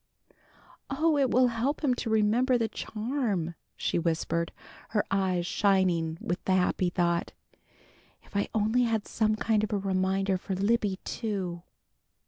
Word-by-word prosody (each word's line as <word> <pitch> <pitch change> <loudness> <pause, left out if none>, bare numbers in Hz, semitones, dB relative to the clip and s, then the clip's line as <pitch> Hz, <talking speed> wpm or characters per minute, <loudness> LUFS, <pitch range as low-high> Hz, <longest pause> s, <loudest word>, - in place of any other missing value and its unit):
"Oh, 310 +3 +2
it 275 -3 +3
will 250 +1 +4
help 245 +7 -1
him 270 -4 +3
to 245 - -3
remember 220 +4 +3
the 230 -1 0
charm!" 215 - -2 0.2
she - - 0
whispered, 165 0 -1 0.4
her 210 - +1
eyes 185 -3 +1
shining 180 -5 +2
with 175 +2 -3
the 190 - +2
happy 180 0 +2
thought. 175 -1 0 0.9
"If - - -20
I 200 - +1
only 220 +3 +2
had 225 -3 -1
some 215 -1 +1
kind 215 -1 +1
of 215 - -2
a 210 - +1
reminder 190 0 0
for 190 +1 -4
Libby, 200 0 +1
too!" 190 -6 -3
205 Hz, 145 wpm, -28 LUFS, 185-230 Hz, 0.9 s, will